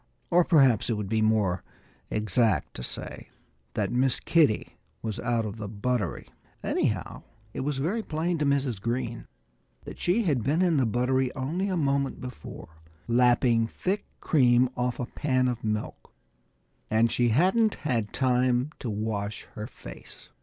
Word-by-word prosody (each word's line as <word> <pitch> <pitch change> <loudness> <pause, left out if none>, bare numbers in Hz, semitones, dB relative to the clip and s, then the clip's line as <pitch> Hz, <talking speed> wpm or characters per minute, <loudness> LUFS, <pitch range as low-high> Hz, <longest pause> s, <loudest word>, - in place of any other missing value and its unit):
Or 175 +1 +6
perhaps 135 - +4
it - - +2
would 105 -3 -3
be 110 0 +1
more 105 -4 +2 0.5
exact 105 - +1
to - - -7
say - - -6 0.5
that - - 0
Miss 125 +1 +2
Kitty 150 -10 +2 0.3
was 110 -3 -3
out 115 -2 0
of 105 +1 -5
the 110 -2 -5
buttery. 105 -1 -2 0.4
Anyhow, - - -1 0.3
it - - -5
was 140 +1 -1
very 180 +12 0
plain 165 -2 -2
to 150 - +1
Mrs. 135 -7 0
Green 120 +1 -3 0.6
that - - -9
she 195 +7 +2
had 140 - +1
been 155 +8 +2
in 170 -4 +3
the 130 -4 +3
buttery 125 +3 +1
only 155 +9 -2
a 185 -2 -1
moment 140 -3 0
before, 80 -10 -9 0.3
lapping 120 -1 +3
thick 190 - -3
cream 125 -5 +4
off 125 0 -1
a 125 - -1
pan 130 0 0
of 120 -2 -3
milk. 105 -1 -3 0.8
And 110 +1 +3
she 120 0 +2
hadn't 190 - +3
had 115 -7 0
time 125 +1 +1
to 125 - -4
wash 105 -1 -3
her 105 0 -6
face. - - -12
125 Hz, 155 wpm, -27 LUFS, 110-140 Hz, 0.8 s, Or